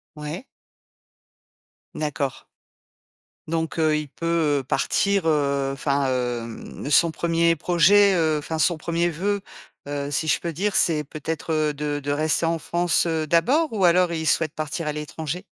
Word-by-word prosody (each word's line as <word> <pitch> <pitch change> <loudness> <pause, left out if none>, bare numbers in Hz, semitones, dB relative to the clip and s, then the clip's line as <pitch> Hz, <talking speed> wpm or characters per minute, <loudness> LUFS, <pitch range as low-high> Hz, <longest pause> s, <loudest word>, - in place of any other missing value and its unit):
Ouais. 150 - -6 1.5
D'accord. 145 -3 -3 1.0
Donc, 165 +1 -2
heu, 155 -1 +3
il 150 -1 -3
peut, 165 -2 0
heu, - - -6
partir, 200 +8 +1
heu, 140 -3 +1
enfin, 140 0 0
hem, 120 -2 -3 0.2
ne - - -4
son 165 +3 +4
1er 165 0 +1
projet, 185 +5 +4
heu, 160 -3 +2
enfin 160 +2 -4
son 165 +2 +2
1er 170 +2 -1
vœu, 200 +5 -1 0.5
heu, 145 0 -4
si 155 +3 -1
je - - +3
peux 170 - -3
dire, 195 +6 -2
c'est 155 -3 +2
peut-être, 160 +3 -4
heu, 155 -1 +1
de 145 0 -3
de 145 - -2
rester 155 +3 +1
en 165 0 0
France, 175 +2 +1
heu, 160 -2 -1
d'abord? 255 - +2
Ou 200 -4 +1
alors 175 0 +4
il 160 -1 -3
souhaite 155 +1 +2
partir 155 +1 -4
à - - 0
l'étranger? 150 +3 -5
160 Hz, 160 wpm, -23 LUFS, 145-170 Hz, 1.5 s, son